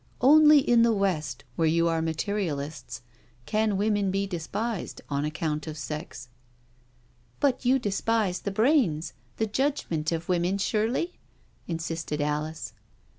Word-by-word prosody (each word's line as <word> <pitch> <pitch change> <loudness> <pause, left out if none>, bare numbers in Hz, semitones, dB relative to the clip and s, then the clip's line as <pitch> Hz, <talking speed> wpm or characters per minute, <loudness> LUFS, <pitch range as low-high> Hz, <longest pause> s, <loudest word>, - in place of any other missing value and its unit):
Only 300 +3 +8
in 240 -4 +4
the 235 0 +5
West, 155 -10 -1
where 160 - +2
you 170 +1 +3
are 165 -1 +1
materialists, 150 - -3 0.4
can 215 - +1
women 205 -1 +1
be 195 +1 0
despised 200 +4 -4
on 140 +1 0
account 155 -1 -3
of 155 0 -5
sex 150 -4 -6
'• - - -34 0.5
" 120 0 -36
But 270 -2 +1
you 260 +2 +5
despise 210 -3 0
the - - -3
brains, 200 - +2 0.2
the 220 - +1
judgment, 215 - -1
of 165 0 -3
women, 180 +2 +1
surely?" 225 - -1 0.5
insisted 165 -2 -3
Alice. 150 -1 -2
175 Hz, 135 wpm, -27 LUFS, 155-220 Hz, 0.5 s, Only